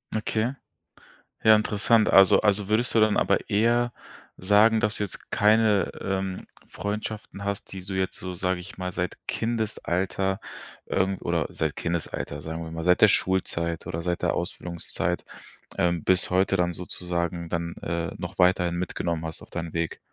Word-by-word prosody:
Okay. 110 Hz, +3 st, 0 dB, 0.9 s
Ja 110 Hz, 0 st, +8 dB
interessant. 105 Hz, +1 st, +3 dB
Also 95 Hz, -2 st, +7 dB
also, 105 Hz, -1 st, +2 dB
würdest 110 Hz, +3 st, +1 dB
du 115 Hz, -, +4 dB
dann 110 Hz, -1 st, +4 dB
aber -, -, +1 dB
eher 120 Hz, +3 st, +2 dB, 0.4 s
sagen, 105 Hz, +4 st, +4 dB
dass 105 Hz, 0 st, +1 dB
du 105 Hz, -, -1 dB
jetzt 100 Hz, -, -8 dB
keine, 105 Hz, -1 st, +3 dB
ähm, 95 Hz, -1 st, -3 dB, 0.2 s
Freundschaften 105 Hz, -1 st, -5 dB
hast, 100 Hz, 0 st, -4 dB
die 95 Hz, -, -6 dB
so 95 Hz, +1 st, -7 dB
jetzt 95 Hz, -1 st, -2 dB
so, 90 Hz, 0 st, -5 dB
sage 90 Hz, 0 st, -1 dB
ich 95 Hz, +3 st, -10 dB
mal, 90 Hz, -1 st, -3 dB
seit 90 Hz, 0 st, -3 dB
Kindesalter, 95 Hz, -4 st, -1 dB, 0.5 s
ähm 95 Hz, 0 st, 0 dB
oder -, -, 0 dB
seit -, -, -2 dB
Kindesalter, 85 Hz, -3 st, -3 dB
sagen 80 Hz, +1 st, -5 dB
wir 80 Hz, -, -7 dB
mal, 80 Hz, 0 st, -5 dB
seit 90 Hz, +1 st, +3 dB
der 110 Hz, -, +9 dB
Schulzeit 85 Hz, -4 st, 0 dB
oder 85 Hz, -1 st, -3 dB
seit 90 Hz, 0 st, -1 dB
der 90 Hz, -, +1 dB
Ausbildungszeit, 85 Hz, -1 st, -3 dB, 0.6 s
ähm, 85 Hz, -2 st, +1 dB
bis 90 Hz, -1 st, +3 dB
heute 95 Hz, +1 st, +2 dB
dann 90 Hz, -1 st, +1 dB
sozusagen 85 Hz, -1 st, -3 dB
dann, 85 Hz, -1 st, -2 dB
äh, 85 Hz, 0 st, -2 dB
noch -, -, -6 dB
weiterhin 90 Hz, -1 st, +3 dB
mitgenommen 85 Hz, -2 st, -2 dB
hast 80 Hz, -1 st, -6 dB
auf -, -, -13 dB
deinen 85 Hz, -2 st, -5 dB
Weg? 85 Hz, -1 st, -2 dB
95 Hz, 165 wpm, -26 LUFS, 85-105 Hz, 0.9 s, der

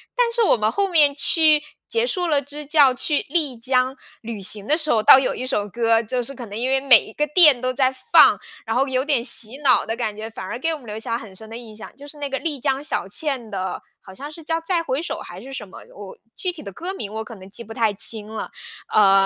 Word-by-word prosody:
但 485 Hz, -2 st, +1 dB
是 470 Hz, -, +1 dB
我 420 Hz, -, +3 dB
们 215 Hz, 0 st, 0 dB
后 400 Hz, -, 0 dB
面 300 Hz, -5 st, +4 dB
去 305 Hz, +1 st, +5 dB, 0.3 s
结 460 Hz, +1 st, 0 dB
束 365 Hz, -7 st, -2 dB
了 300 Hz, -4 st, +1 dB
支 290 Hz, +2 st, -9 dB
教， 285 Hz, -3 st, +4 dB
去 290 Hz, +3 st, 0 dB
丽 295 Hz, -5 st, +1 dB
江 255 Hz, +2 st, 0 dB, 0.3 s
旅 225 Hz, -3 st, -7 dB
行 200 Hz, +1 st, +3 dB
的 300 Hz, -, +3 dB
时 310 Hz, -2 st, 0 dB
候， 220 Hz, -2 st, +2 dB
倒 265 Hz, -, +8 dB
有 265 Hz, -, -2 dB
一 255 Hz, -, -5 dB
首 210 Hz, -5 st, -2 dB
歌， 230 Hz, +1 st, +1 dB
就 245 Hz, +2 st, -3 dB
是 275 Hz, -, -3 dB
可 250 Hz, -4 st, -9 dB
能 205 Hz, +1 st, -7 dB
因 245 Hz, +3 st, -2 dB
为 265 Hz, 0 st, +1 dB
每 250 Hz, -6 st, +6 dB
一 215 Hz, -, -13 dB
个 300 Hz, +5 st, -1 dB
店 300 Hz, -5 st, +6 dB
都 255 Hz, 0 st, -1 dB
在 260 Hz, 0 st, +1 dB, 0.2 s
放， -, -, +6 dB, 0.3 s
然 225 Hz, 0 st, -3 dB
后 270 Hz, +3 st, +1 dB
有 260 Hz, 0 st, -1 dB
点 280 Hz, -6 st, 0 dB
洗 235 Hz, 0 st, +2 dB
脑 260 Hz, -4 st, +3 dB
的 225 Hz, -, -3 dB
感 220 Hz, -3 st, -4 dB
觉， 220 Hz, +1 st, -6 dB
反 190 Hz, -, -9 dB
而 190 Hz, -, -6 dB
给 325 Hz, +6 st, -2 dB
我 310 Hz, -, -6 dB
们 245 Hz, -, -16 dB
留 210 Hz, -, -6 dB
下 225 Hz, +1 st, -4 dB
很 220 Hz, -5 st, -9 dB
深 220 Hz, +3 st, -10 dB
的 225 Hz, -, -10 dB
印 230 Hz, -3 st, -12 dB
象， 220 Hz, -, -12 dB
就 285 Hz, +2 st, -13 dB
是 295 Hz, -, -10 dB
那 290 Hz, -1 st, -4 dB
个 270 Hz, -1 st, -4 dB
丽 290 Hz, -1 st, -3 dB
江 275 Hz, +1 st, -1 dB
小 300 Hz, -, -2 dB
倩 255 Hz, +1 st, -3 dB
的， 190 Hz, -2 st, -5 dB, 0.2 s
好 190 Hz, -, -14 dB
像 280 Hz, +10 st, -9 dB
是 315 Hz, +1 st, -12 dB
叫 325 Hz, +1 st, -1 dB
《再 345 Hz, -2 st, 0 dB
回 275 Hz, -2 st, -2 dB
首》 340 Hz, -, -4 dB
还 -, -, -10 dB
是 270 Hz, -, -11 dB
什 230 Hz, -5 st, -6 dB
么， -, -, -12 dB, 0.2 s
我 200 Hz, -1 st, -11 dB, 0.2 s
具 365 Hz, -, -2 dB
体 340 Hz, -3 st, -11 dB
的 200 Hz, -8 st, -9 dB
歌 360 Hz, -, -6 dB
名 210 Hz, -, -6 dB
我 220 Hz, 0 st, -4 dB
可 225 Hz, +1 st, -11 dB
能 190 Hz, -1 st, -14 dB
记 220 Hz, +4 st, -6 dB
不 225 Hz, -, -10 dB
太 225 Hz, -3 st, 0 dB
清 210 Hz, +1 st, +1 dB
了， 220 Hz, 0 st, -7 dB, 0.4 s
呃， 195 Hz, -2 st, +5 dB
255 Hz, 295 characters per minute, -21 LUFS, 220-295 Hz, 0.4 s, 倒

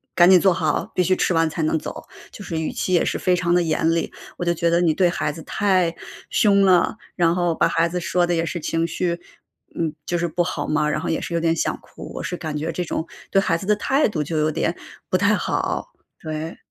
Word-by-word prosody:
“赶 175 Hz, 0 st, +7 dB
紧 185 Hz, -1 st, +8 dB
坐 190 Hz, +1 st, +4 dB
好， 160 Hz, -2 st, -1 dB
必 -, -, +1 dB
须 185 Hz, +1 st, +2 dB
吃 185 Hz, -, +1 dB
完 165 Hz, -1 st, +2 dB
才 160 Hz, +1 st, -3 dB
能 155 Hz, +1 st, +1 dB
走”， -, -, -7 dB, 0.3 s
就 205 Hz, -, -10 dB
是 165 Hz, -4 st, -3 dB
语 160 Hz, -, -2 dB
气 185 Hz, -, -2 dB
也 175 Hz, -, +4 dB
是 -, -, -1 dB
非 180 Hz, -1 st, +2 dB
常 175 Hz, -1 st, +1 dB
得 175 Hz, -, +4 dB
严 160 Hz, 0 st, +1 dB
厉。 165 Hz, -, -1 dB, 0.3 s
我 175 Hz, -, -3 dB
就 170 Hz, -, +2 dB
觉 170 Hz, 0 st, +1 dB
得 170 Hz, +1 st, +3 dB
你 165 Hz, -3 st, +3 dB
对 180 Hz, +2 st, +3 dB
孩 155 Hz, -3 st, -1 dB
子 160 Hz, -, -9 dB
太 185 Hz, -4 st, +1 dB, 0.3 s
凶 200 Hz, -2 st, +4 dB
了， 185 Hz, -3 st, +4 dB, 0.2 s
然 170 Hz, -2 st, +3 dB
后 175 Hz, -2 st, 0 dB
把 -, -, +3 dB
孩 165 Hz, +1 st, +2 dB
子 180 Hz, +1 st, -2 dB
说 175 Hz, 0 st, +1 dB
得 175 Hz, -, +1 dB
也 165 Hz, 0 st, 0 dB
是 175 Hz, -, -3 dB
情 165 Hz, +1 st, -1 dB
绪， 170 Hz, +1 st, -2 dB, 0.6 s
嗯， 160 Hz, -2 st, -1 dB
就 175 Hz, -, -1 dB
是 175 Hz, -, 0 dB
不 175 Hz, +2 st, 0 dB
好 180 Hz, -, -3 dB
嘛， 150 Hz, 0 st, +1 dB
然 155 Hz, 0 st, -1 dB
后 -, -, -3 dB
也 160 Hz, -, 0 dB
是 -, -, -5 dB
有 170 Hz, -, +1 dB
点 165 Hz, 0 st, +1 dB
想 -, -, 0 dB
哭。 -, -, -11 dB
我 -, -, -5 dB
是 180 Hz, -, -3 dB
感 155 Hz, -3 st, -5 dB
觉 160 Hz, +3 st, -2 dB
这 180 Hz, -, -3 dB
种 160 Hz, 0 st, -3 dB, 0.2 s
对 195 Hz, -, +4 dB
孩 195 Hz, -, +1 dB
子 180 Hz, -, -8 dB
的 210 Hz, +1 st, +3 dB
态 270 Hz, +7 st, +2 dB
度 170 Hz, -8 st, -2 dB
就 160 Hz, +2 st, -3 dB
有 155 Hz, 0 st, +2 dB
点 -, -, -1 dB, 0.3 s
不 -, -, +2 dB
太 -, -, +3 dB
好， -, -, -2 dB, 0.3 s
对。 155 Hz, +1 st, -5 dB
170 Hz, 275 characters per minute, -22 LUFS, 160-180 Hz, 0.6 s, 紧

